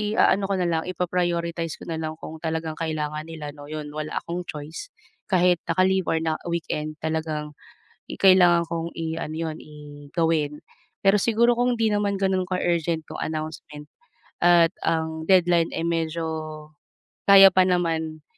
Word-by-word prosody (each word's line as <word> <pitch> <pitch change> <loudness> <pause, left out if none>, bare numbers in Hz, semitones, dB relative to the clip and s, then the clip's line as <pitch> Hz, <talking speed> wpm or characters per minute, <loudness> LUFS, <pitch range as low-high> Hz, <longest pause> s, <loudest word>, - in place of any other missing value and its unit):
iaano 200 -2 +3
ko 200 - -1
nalang, 170 -2 0
ipa-prioritize 170 -2 -1
ko - - -10
nalang 160 -1 -3
kung 160 - -8
talagang 160 -1 -2
kailangan 155 -1 -3
nila, 155 -3 -7
'no, 145 -1 -11
'yon, 155 -1 -5
wala 155 0 -5
akong 175 +1 -5
choice 155 - -7 0.4
kahit 180 -2 +3
naka-leave 185 +2 +2
or 160 - +1
na 160 -1 -1
weekend 155 -2 -3
talagang 155 -1 -2 0.6
i - - -5
kailangan 180 -3 +6
kong 170 0 -4
iano 160 -1 -4
'yon, 160 -1 -4
i 145 -1 -12
gawin. 160 -3 0 0.4
Pero 195 +1 +4
siguro 235 +3 +2
kung 245 0 +2
hindi 225 -1 +2
naman 205 -1 0
gano'n 190 -1 +1
ka-urgent 170 -2 0
yung - - -6
announcement 155 -1 -6 0.5
at 170 -1 +6
ang 160 -1 -1
deadline 175 -3 +4
ay 165 - -2
medyo 165 0 -1 1.0
kaya 195 -1 +9
pa 185 0 +4
naman 165 -3 -1
165 Hz, 145 wpm, -24 LUFS, 155-180 Hz, 1.0 s, kaya